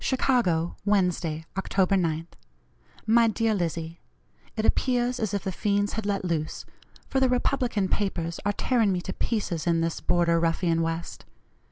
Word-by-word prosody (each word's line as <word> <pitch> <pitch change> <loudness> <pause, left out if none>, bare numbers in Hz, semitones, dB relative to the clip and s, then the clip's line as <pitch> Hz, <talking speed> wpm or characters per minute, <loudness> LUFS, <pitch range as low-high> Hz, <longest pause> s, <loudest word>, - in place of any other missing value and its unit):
"CHICAGO, 230 -11 +1
Wednesday, 180 -6 0
October 195 0 +1
9th. 165 -2 -1 0.8
"MY 230 +1 +5
DEAR 225 0 +1
LIZZIE: 165 -3 -3 0.6
It 215 - 0
appears 250 0 +1
as 215 -3 -1
if 200 - -2
the 190 - -2
fiends 205 +2 0
had 220 -2 -3
let 200 -2 -1
loose, 160 -3 -2 0.4
for 265 - 0
the 260 -1 +3
Republican 245 -5 +1
papers 170 -5 -2
are 205 - +1
tearing 230 -2 +2
me 180 -1 -1
to 190 - -5
pieces 180 -8 -2
in 165 -1 +2
this 165 0 -1
border 170 -1 +2
ruffian 165 0 +1
West. 165 +1 -4
190 Hz, 155 wpm, -26 LUFS, 170-220 Hz, 0.8 s, MY